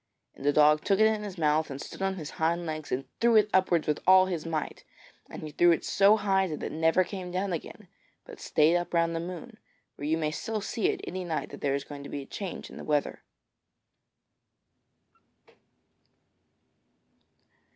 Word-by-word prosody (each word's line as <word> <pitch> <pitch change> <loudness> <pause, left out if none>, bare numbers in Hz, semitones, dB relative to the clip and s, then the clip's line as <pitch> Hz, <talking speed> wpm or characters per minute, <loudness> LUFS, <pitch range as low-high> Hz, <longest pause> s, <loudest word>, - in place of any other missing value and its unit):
And - - -12
the 145 - +3
dog 150 +1 +4
took 195 -1 +2
it 220 - +6
in 220 -1 +2
his 200 -3 -7
mouth, 155 0 +1
and 135 -1 -6
stood - - -9
on 195 0 0
his 155 -5 -7
hind 170 +2 +1
legs 155 -2 -5
and 130 +2 -2
threw 235 0 +4
it 210 -1 +4
upwards 180 -4 +3
with 150 - 0
all 185 0 +7
his 170 -4 -4
might, 155 -2 -4 0.5
and - - -9
he 155 - -6
threw 175 +3 +4
it 165 - 0
so 200 +2 +4
high 195 -2 +1
that 155 -3 -6
it - - -3
never 160 +3 +3
came 185 0 -7
down 185 +1 -2
again 165 - -7 0.4
but - - -12
stayed 155 +3 +3
up 175 0 -2
round 170 0 +2
the - - -1
moon, 185 +7 -8 0.4
where 145 - -5
you 160 +1 +1
may 155 -2 -1
still 220 +7 -3
see 210 +1 -1
it - - -1
any 185 +1 -5
night 165 -3 -3
that - - -10
there 140 -1 +1
is 140 - -3
going 145 -1 -9
to 140 - -9
be 140 - -5
a - - -14
change 190 +5 -7
in - - -11
the - - -8
weather. 150 -2 -1
170 Hz, 200 wpm, -28 LUFS, 155-190 Hz, 0.5 s, all